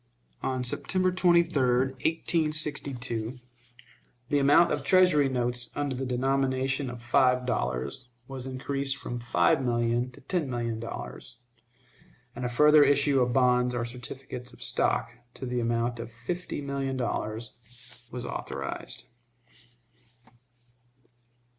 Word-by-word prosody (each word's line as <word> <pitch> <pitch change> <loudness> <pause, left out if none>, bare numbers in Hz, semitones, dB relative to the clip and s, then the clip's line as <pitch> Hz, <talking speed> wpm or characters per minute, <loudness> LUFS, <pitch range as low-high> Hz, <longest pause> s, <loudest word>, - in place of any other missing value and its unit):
On 130 -1 -1
September 185 +9 +1
23, 170 -4 +3
1862, 135 -2 0 1.0
the 145 - +3
amount 145 +5 +5
of 145 - -1
Treasury 165 -4 +5
notes 120 -1 -1
under 145 -2 -1
the 130 +1 -3
denomination 135 +1 0
of 120 -1 -8
five 125 0 +3
dollars 65 - -2 0.2
was 130 -1 -6
increased 135 +1 -2
from 120 - -5
five 135 +4 +2
million 120 0 +1
to 125 - -15
ten 155 0 -2
million 115 -2 -2
dollars, 115 - -7 1.0
and 125 - -5
a 125 - 0
further 150 +4 +6
issue 145 -1 +4
of 125 -1 +1
bonds 125 -1 +3
or 120 -1 -1
certificates 125 +1 -7
of - - -10
stock, 115 - +1 0.2
to 130 - -6
the 125 0 -1
amount 120 0 0
of 115 0 -6
fifty 175 +8 -5
million 140 -1 -2
dollars, 120 +1 -5
was 125 0 -5
authorized. - - -5
130 Hz, 120 wpm, -28 LUFS, 120-140 Hz, 1.0 s, further